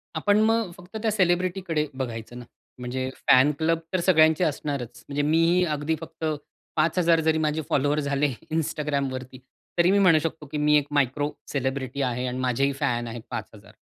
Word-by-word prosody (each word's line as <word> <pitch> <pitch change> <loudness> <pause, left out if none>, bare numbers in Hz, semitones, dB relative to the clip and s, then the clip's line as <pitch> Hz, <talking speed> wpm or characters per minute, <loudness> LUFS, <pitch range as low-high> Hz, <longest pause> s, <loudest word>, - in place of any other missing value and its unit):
आपण 205 +6 +3
मग 225 -3 +2
फक्त 180 +5 -9
त्या 220 -1 +1
सेलिब्रिटीकडे 180 -4 0
बघायचं 120 -3 -5
ना. 120 - -10 0.3
म्हणजे 130 +1 -3 0.2
फॅन 130 +3 +6
क्लब 165 +1 +1
तर 185 - +2
सगळ्यांचे 160 -2 +4
असणारच; 145 -6 -3
म्हणजे 145 0 -1
मीही 165 +4 +3
अगदी 150 0 -1
फक्त 165 0 -7 0.5
5000 165 +1 +3
जरी 160 0 +2
माझे 155 0 0
फॉलोवर 145 0 +2
झाले 140 0 +1 0.3
Instagramवरती, 140 -5 -2 0.4
तरी 175 +2 +4
मी 200 - +4
म्हणू 180 -5 +5
शकतो 160 -1 -4
की - - -2
मी 150 0 +3
एक 145 -1 0
मायक्रो 145 +1 +1 0.2
सेलिब्रिटी 135 0 -2
आहे 125 -1 -1
आणि 125 0 -3
माझेही 130 +2 +1
फॅन 120 -3 -1
आहेत 115 0 -6
5000. 110 -3 -8
150 Hz, 165 wpm, -25 LUFS, 130-165 Hz, 0.5 s, फॅन